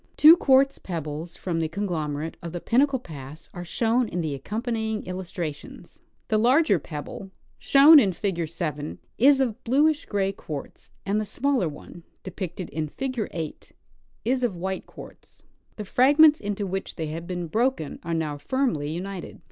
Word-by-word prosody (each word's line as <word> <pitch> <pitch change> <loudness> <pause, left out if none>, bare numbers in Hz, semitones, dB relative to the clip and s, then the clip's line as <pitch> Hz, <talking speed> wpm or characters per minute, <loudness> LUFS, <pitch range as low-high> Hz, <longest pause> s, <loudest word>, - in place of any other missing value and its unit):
Two 315 +2 +10
quartz 275 -3 +3
pebbles 165 -1 -5
from 170 -3 -2
the 160 - 0
conglomerate 160 -4 -3
of 170 -1 -7
Pinnacle 270 +3 +3
pass 150 - -10
are 175 - -6
shown 230 +6 +1
in 175 -3 -3
the 155 -3 -2
accompanying 220 - -3
illustrations. 180 -4 -7 0.3
The 215 - +2
larger 245 - +4
jjebble 150 +6 -7 0.3
(shown 290 +3 +8
in 200 -7 +3
figure 175 -2 -2
7) 155 -2 -4 0.2
is 275 +3 +6
of 245 -5 -1
bluish 295 +5 +2
gray 195 -2 0
quartz, 150 -7 -8 0.2
and 205 +2 +1
the - - -1
smaller 240 - 0
one 155 +3 -11 0.2
(depicted 185 -1 -6
in 155 -1 -2
figure 255 - -3
8) 160 -3 -7 0.5
is 255 +2 +1
of 230 -7 0
white 190 +2 -4
quartz. - - -14 0.3
The 210 - -6
fragments 295 +8 +5
into 205 0 -3
which 195 0 -4
they 160 - -3
have 165 +2 -6
been 175 -1 -3
broken 220 - -1
are 170 - -3
now 150 -3 -2
firmly 195 - -1
united. 180 +3 -6
190 Hz, 155 wpm, -25 LUFS, 165-245 Hz, 0.5 s, Two